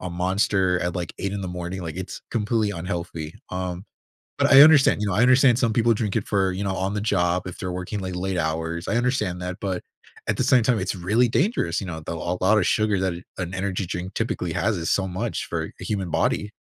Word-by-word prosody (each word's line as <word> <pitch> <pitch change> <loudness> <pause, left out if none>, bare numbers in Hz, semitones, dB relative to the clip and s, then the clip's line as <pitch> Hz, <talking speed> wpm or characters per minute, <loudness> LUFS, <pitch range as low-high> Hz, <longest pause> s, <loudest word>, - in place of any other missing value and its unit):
a 90 - -4
Monster 95 +1 +1
at, 90 -1 -2
like, 85 -2 -4
8:00 100 0 -2
in 100 - -3
the 95 - -4
morning, 90 +1 -5
like, 80 0 -6
it's 95 - -6
completely 110 -1 0
unhealthy, 85 -3 -5 0.2
um, 90 +1 -4 0.5
but - - +3
I 135 +1 +10
understand, 150 -7 +6
you 105 - 0
know, 95 - 0
I 105 - +3
understand 130 -1 +5
some 115 -3 +2
people 115 +1 +3
drink 105 -1 -2
it 105 - -1
for, 95 -2 +1
you 95 +2 -3
know, 95 -1 -1
on 95 +2 -1
the 105 - -1
job 90 -4 +1
if 90 - -7
they're 90 - -4
working, 90 +3 -4
like, 95 -1 -4
late 95 0 -2
hours, 80 +1 -2
I 115 - +1
understand 115 -8 0
that, 90 0 -5
but 95 -3 -3 0.4
at - - 0
the - - +2
same 125 -3 +5
time, 115 -1 +2
it's 90 - -2
really 105 +7 +2
dangerous, 115 - +1
you - - -5
know, 80 -2 -5
though 85 +2 -5
a 90 +1 -2
lot 105 +4 +4
of 95 - +1
sugar 105 -3 +2
that 95 -2 0
an 85 - -8 0.2
an 90 0 -4
energy 95 0 -2
drink 90 +2 -5
typically 90 -7 -2
has 105 -1 +1
is 80 - -2
so 95 -1 +1
much 105 +6 -3
for - - -3
a - - -6
human 95 -5 -2
body. 105 - 0
95 Hz, 245 wpm, -24 LUFS, 90-105 Hz, 0.5 s, I